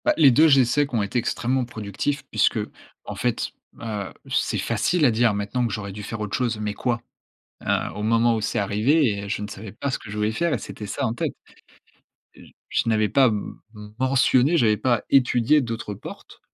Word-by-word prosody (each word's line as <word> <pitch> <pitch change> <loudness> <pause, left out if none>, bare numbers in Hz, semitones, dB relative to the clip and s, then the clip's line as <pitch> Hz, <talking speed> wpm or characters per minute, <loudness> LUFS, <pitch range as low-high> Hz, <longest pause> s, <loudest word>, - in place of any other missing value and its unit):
Bah 305 - +4
les 140 -3 +7
2 155 +6 +6
j'essaie 135 0 +4
qu'ont 115 -6 -1
été 100 +5 -1
extrêmement 125 +2 -1
productifs 115 +4 -3
puisqu'en - - -2
fait, - - -1 0.2
ben, 105 -4 -5
heu, - - -16 0.2
c'est - - 0
facile 175 -4 +1
à 125 - +5
dire 115 -1 +2
maintenant 105 +5 -1
que - - -6
j'aurais 100 -2 -4
dû 105 +2 -8
faire 110 +2 -6
autre 105 -2 -3
chose, 120 -4 -1
mais 105 -1 -2
quoi 120 +2 -2 0.6
?Heu, - - 0
au 105 - -4
moment 115 +1 +3
où 110 - -2
c'est - - -1
arrivé, 105 +2 +2
heu, - - -6
je 105 - -2
ne 105 - -4
savais 105 0 -9
pas 130 +6 -4
ce - - -1
que 105 - -11
je 105 - -5
voulais 105 +1 +1
faire 170 +7 0
et - - -1
c'était 105 - -8
ça 100 - -3
en 110 - -2
tête. - - -2 1.0
J - - -16 0.2
je - - 0
n'avais 110 -2 +2
pas 135 +5 +5
m 105 -3 -3 0.4
mentionné, 130 +3 +3
j'avais 110 -7 +3
pas 120 -1 +1
étudié 135 +2 +4
d'autres 115 -4 -4
portes. - - -11
115 Hz, 205 wpm, -23 LUFS, 105-130 Hz, 1.0 s, les